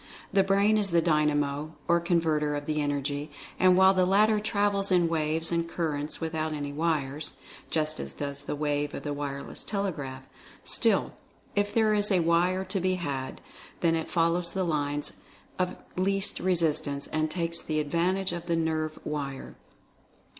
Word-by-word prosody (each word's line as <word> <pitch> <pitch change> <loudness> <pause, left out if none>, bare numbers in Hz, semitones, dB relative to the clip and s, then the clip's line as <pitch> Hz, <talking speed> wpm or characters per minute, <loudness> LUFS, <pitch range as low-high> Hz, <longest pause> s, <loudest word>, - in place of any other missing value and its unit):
The 195 - +5
Brain 200 +2 +3
is 200 -2 0
the 170 -1 +4
Dynamo, 150 -2 +1
or 170 0 +4
Con 170 0 +2
verter 150 -2 0
of 145 - -6
the 150 0 0
Energy, 145 +1 -2 0.3
and 185 -1 +6
while 190 0 +7
the 185 -1 +3
latter 210 +3 +4
travels 200 -2 +1
in 175 -2 +4
waves 160 0 0
and 170 0 0
currents 150 -3 -2
without 160 -1 -2
any 145 -1 -4
wires 150 -2 -1 0.4
(just 155 -1 -1
as - - -6
does 140 -1 -4
the - - -4
wave 145 0 -1
of - - -6
the 145 - -2
wireless 140 -1 -5
telegraph) 150 -11 -3 0.4
still - - +2 0.4
if 205 0 +1
there 220 -2 +3
is 210 0 +2
a 185 -3 +4
wire 175 +3 +2
to 190 +1 -2
be 185 +1 +1
had, 140 -7 -4 0.4
then 165 -1 +3
it 160 -1 -2
follows 170 0 +1
the 190 - 0
lines 145 -3 -1 0.4
of 180 0 0 0.2
least 195 +2 0
re 185 0 +2
sistance 150 -4 0
and 155 0 +1
takes 170 0 -2
advantage 170 +5 +1
of 175 -1 -5
the 170 - +1
nerve 160 -1 -1
wire. 140 -3 -4
165 Hz, 170 wpm, -28 LUFS, 150-185 Hz, 0.4 s, while